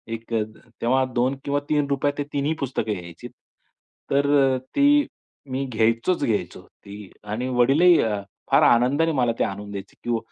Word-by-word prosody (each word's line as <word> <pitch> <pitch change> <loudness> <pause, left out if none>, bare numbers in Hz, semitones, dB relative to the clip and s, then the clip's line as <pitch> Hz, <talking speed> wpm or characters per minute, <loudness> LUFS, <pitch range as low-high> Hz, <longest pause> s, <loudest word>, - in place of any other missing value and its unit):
एक 115 +1 -10
तेव्हा 115 +4 -1
2 125 +3 +1
किंवा 145 0 0
₹3 145 -2 +1
रुपयात 140 +1 0
ते 145 - -1
3ही 145 +2 0
पुस्तकं 125 -5 -2
यायची. 85 -3 -9 0.8
तर 140 +1 +2 0.3
अ, - - -1 0.2
ती 290 +1 +4 0.5
मी 135 +1 -2
घ्यायचोच 115 +8 0
घ्यायचो 110 -3 -2 0.2
ती 100 -1 -10
आणि 110 +5 -4
वडीलही 160 +8 +5
अ, 105 -2 -1 0.3
फार - - +5
आनंदाने 140 +8 +3
मला 125 -5 +1
ते - - +3
आणून 100 +1 -6
द्यायचे, 100 -1 -8
की 115 - +2
125 Hz, 155 wpm, -23 LUFS, 110-145 Hz, 0.8 s, वडीलही